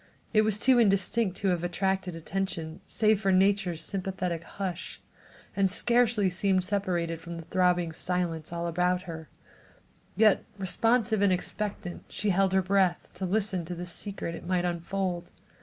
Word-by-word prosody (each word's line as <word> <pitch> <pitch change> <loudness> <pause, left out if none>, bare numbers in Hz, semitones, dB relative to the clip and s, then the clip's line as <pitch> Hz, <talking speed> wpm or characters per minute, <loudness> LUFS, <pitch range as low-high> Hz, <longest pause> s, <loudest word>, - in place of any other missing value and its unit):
It 215 - +6
was 215 -1 +2
too 250 +3 +5
indistinct 200 -1 +2
to 195 - 0
have 175 -2 0
attracted 190 0 -1
attention 165 -1 -4
save 215 -2 +2
for 195 -2 +2
nature's 190 -3 +2
sympathetic 185 -3 -3
hush, 185 -1 -5 0.6
and 195 -1 +3
scarcely 235 0 +3
seemed 185 +1 +1
separated 180 -4 -1
from 170 0 -7
the 165 - -7
throbbing 180 -2 +1
silence 165 -2 -2
all 170 0 -3
about 180 +2 0
her; 160 -3 -8 0.9
yet, 215 -2 +4
responsive 220 +2 +1
and 200 -2 +4
expectant 185 0 -3
she 210 - -1
held 190 +1 +2
her 190 0 +2
breath 185 -2 +1
to 185 +1 -4
listen 195 -2 0
to 175 +2 -5
the 175 +1 -6
secret 180 0 -3
it 170 - -8
might 180 -1 +1
unfold. 175 +1 -2
185 Hz, 155 wpm, -28 LUFS, 175-200 Hz, 0.9 s, It